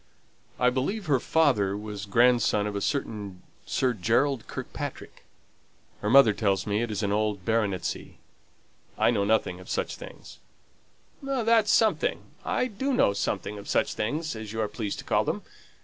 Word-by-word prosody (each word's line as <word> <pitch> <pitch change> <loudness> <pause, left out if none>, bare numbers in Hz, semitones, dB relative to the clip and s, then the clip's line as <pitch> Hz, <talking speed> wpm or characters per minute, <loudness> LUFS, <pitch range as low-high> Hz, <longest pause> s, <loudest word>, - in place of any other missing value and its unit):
"I 125 0 +4
believe 180 - -2
her 140 -5 +2
father 120 -11 +2
was 105 -1 -6
grandson 120 -1 +3
of 105 -1 -3
a 100 - -2
certain 105 -8 -3 0.2
Sir 130 -2 +1
Gerald 115 +5 +1
Kirkpatrick. - - -7 0.8
Her 105 - -1
mother 125 -3 +7
tells 100 -2 0
me 105 +1 0
it 120 - -2
is 105 0 -3
an 100 - 0
old 105 -2 -1
baronetcy. 105 -5 -1 0.8
I - - +4
know 100 -4 +1
nothing 100 -4 +1
of 90 - -13
such - - -2
things." - - -12 0.8
"That's 230 -6 +2
something. 220 +1 +2 0.2
I - - 0
do 265 +4 -2
know 100 - +3
something 105 +1 -3
of 100 - -10
such - - +1
things, 150 +7 -2
as 110 -1 -7
you 110 - -4
are 105 - 0
pleased 105 -1 -4
to - - -8
call - - +2
them. - - -3
110 Hz, 165 wpm, -27 LUFS, 100-140 Hz, 0.8 s, mother